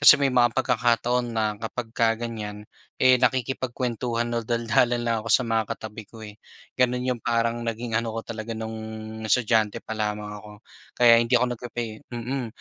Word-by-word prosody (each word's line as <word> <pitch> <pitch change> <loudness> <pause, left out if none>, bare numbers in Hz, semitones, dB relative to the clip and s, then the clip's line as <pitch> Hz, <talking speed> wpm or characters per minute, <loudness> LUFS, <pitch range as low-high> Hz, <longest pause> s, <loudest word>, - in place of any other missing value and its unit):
Kasi 145 - +9
may 140 - +3
mga 120 -2 +3
pagkakataon 120 -1 +1
na 110 -1 0
kapagka 115 0 -1
ganyan, 105 -3 -6 0.3
eh, 130 0 +7
nakikipagkuwentuhan 125 -1 -1
o - - +2
daldalan 120 +1 +2
lang 115 -1 +1
ako - - -5
sa 125 - +5
mga 115 -2 0
katabi 110 0 -8
ko 115 0 -13
eh, 105 -1 -9 0.4
gano'n 125 0 +2
yung - - -16
parang 115 0 +1
naging 115 0 -2
ano 115 -1 -3
ko 115 - -2
talaga, 115 0 -6
nung 110 0 -5 0.5
estudyante 110 0 +2
pa 110 - -6
lamang 105 -1 -2
ako. 105 +1 -12 0.5
Kaya 120 -1 +7
hindi 120 +2 +1
ako 125 0 +1
nagpe-pay 120 0 -6
mm, 120 +2 -3
115 Hz, 165 wpm, -25 LUFS, 110-120 Hz, 0.5 s, Kasi